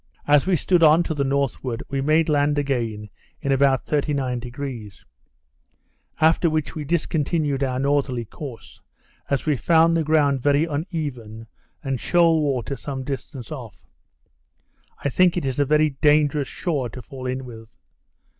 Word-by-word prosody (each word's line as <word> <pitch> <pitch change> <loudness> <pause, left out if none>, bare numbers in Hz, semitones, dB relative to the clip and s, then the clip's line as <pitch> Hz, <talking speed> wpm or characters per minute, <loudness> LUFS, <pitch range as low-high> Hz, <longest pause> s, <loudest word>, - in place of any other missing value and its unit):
As 145 +3 +4
we 190 - +3
stood 175 +2 +2
on 160 +1 +6
to 165 - -3
the 145 -2 -1
northward, 135 -3 -2
we 135 -1 -2
made 155 +3 +2
land 145 -1 +2
again 115 -7 -2 0.3
in 140 - -2
about 135 -1 +2
39°; 130 -6 -3 1.2
after 160 +2 +3
which 155 -2 -2
we 155 - -5
discontinued 150 -2 -1
our 130 -1 -1
northerly 135 -3 0
course, 125 +1 -10 0.5
as 140 - -1
we 150 -2 +2
found 165 +5 +3
the 165 - +1
ground 145 -3 +2
very 145 +3 +3
uneven, 145 - -5 0.4
and 135 -3 -2
shoal 165 0 +3
water 135 -2 -1
some 135 0 -6
distance 135 -1 -6
off. 120 - -9 1.2
I - - +1
think 180 +5 +3
it 135 -5 -2
a 145 - +3
very 150 +1 +3
dangerous 145 0 +2
shore 145 -8 -2
to 125 +2 -10
fall 130 +2 -8
in 130 +1 -3
with. 115 -2 -11
140 Hz, 145 wpm, -23 LUFS, 130-155 Hz, 1.2 s, on